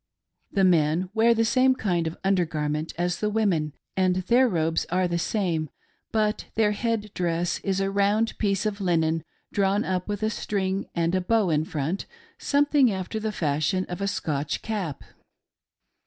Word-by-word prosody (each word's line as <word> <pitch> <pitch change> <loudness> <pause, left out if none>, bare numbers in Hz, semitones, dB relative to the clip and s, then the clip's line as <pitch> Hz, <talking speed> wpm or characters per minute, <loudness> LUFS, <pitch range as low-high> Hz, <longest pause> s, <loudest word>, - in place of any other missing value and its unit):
The 195 - +2
men 175 0 +3
wear 230 +1 +4
the 225 0 +2
same 260 +3 +4
kind 175 -8 0
of 160 - -5
under 190 -2 +3
gar 155 -2 -3
ment 150 +2 -2
as 175 0 -1
the 210 - 0
women, 190 -9 +1 0.2
and 185 -1 +2
their 240 +8 +3
robes 165 -3 0
are 180 +1 +1
the 170 -1 -1
same, 170 -6 -1 0.4
but 215 -1 0
their 215 -1 +3
head 215 -1 -2
dress 175 0 -1
is 195 -1 -1
a 195 0 0
round 205 +3 +1
piece 200 -1 0
of 205 -1 -2
linen 165 -3 +1 0.3
drawn 200 +1 +2
up 185 -1 -2
with 205 0 -3
a 215 - +1
string 195 -2 -2
and 170 0 +1
a 185 - +2
bow 205 -1 +2
in 155 0 +1
front, 160 +5 -3 0.3
something 285 -3 +3
after 190 +3 -3
the 215 0 -2
fashion 155 +2 0
of 180 +2 -5
a 200 - 0
Scotch 150 -6 -2
cap. 190 -10 -3
190 Hz, 175 wpm, -25 LUFS, 170-210 Hz, 0.4 s, wear